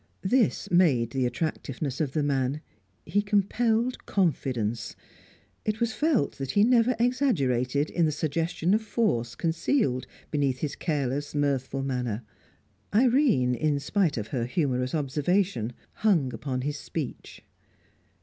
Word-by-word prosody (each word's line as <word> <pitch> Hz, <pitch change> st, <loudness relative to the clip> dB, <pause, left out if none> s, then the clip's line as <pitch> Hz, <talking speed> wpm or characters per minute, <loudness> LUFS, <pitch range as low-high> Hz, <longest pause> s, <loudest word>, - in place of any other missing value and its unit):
This 235 Hz, +3 st, +2 dB
made 140 Hz, -11 st, +3 dB
the 130 Hz, -2 st, +1 dB
attractiveness 140 Hz, -1 st, -3 dB
of 140 Hz, -4 st, -1 dB
the 155 Hz, -, +1 dB
man; 140 Hz, 0 st, 0 dB, 0.4 s
he 205 Hz, -, +1 dB
compelled 220 Hz, +4 st, +1 dB
confidence; 125 Hz, -, -1 dB, 0.7 s
it 215 Hz, 0 st, -1 dB
was 235 Hz, -2 st, 0 dB
felt 295 Hz, -, +1 dB
that 135 Hz, -1 st, -4 dB
he 205 Hz, +8 st, +4 dB
never 245 Hz, +1 st, +4 dB
exaggerated 150 Hz, -, +1 dB
in 170 Hz, -2 st, +2 dB
the -, -, +1 dB
suggestion 165 Hz, +4 st, 0 dB
of 215 Hz, -, +3 dB
force 200 Hz, -, 0 dB
concealed 160 Hz, -, 0 dB, 0.2 s
beneath 140 Hz, -4 st, +1 dB
his 145 Hz, -2 st, -2 dB
careless, 145 Hz, -2 st, -2 dB
mirthful 135 Hz, -2 st, 0 dB
manner. 125 Hz, -4 st, -2 dB, 0.7 s
Irene, 230 Hz, -, +3 dB
in 145 Hz, +4 st, 0 dB
spite 165 Hz, +1 st, 0 dB
of 110 Hz, 0 st, -4 dB
her 120 Hz, -2 st, -1 dB
humorous 130 Hz, -1 st, 0 dB
observation, 150 Hz, -, 0 dB, 0.3 s
hung 165 Hz, -, +2 dB
upon 130 Hz, -2 st, -3 dB
his 145 Hz, +2 st, -2 dB
speech. 155 Hz, -6 st, -6 dB
150 Hz, 130 wpm, -27 LUFS, 130-205 Hz, 0.7 s, he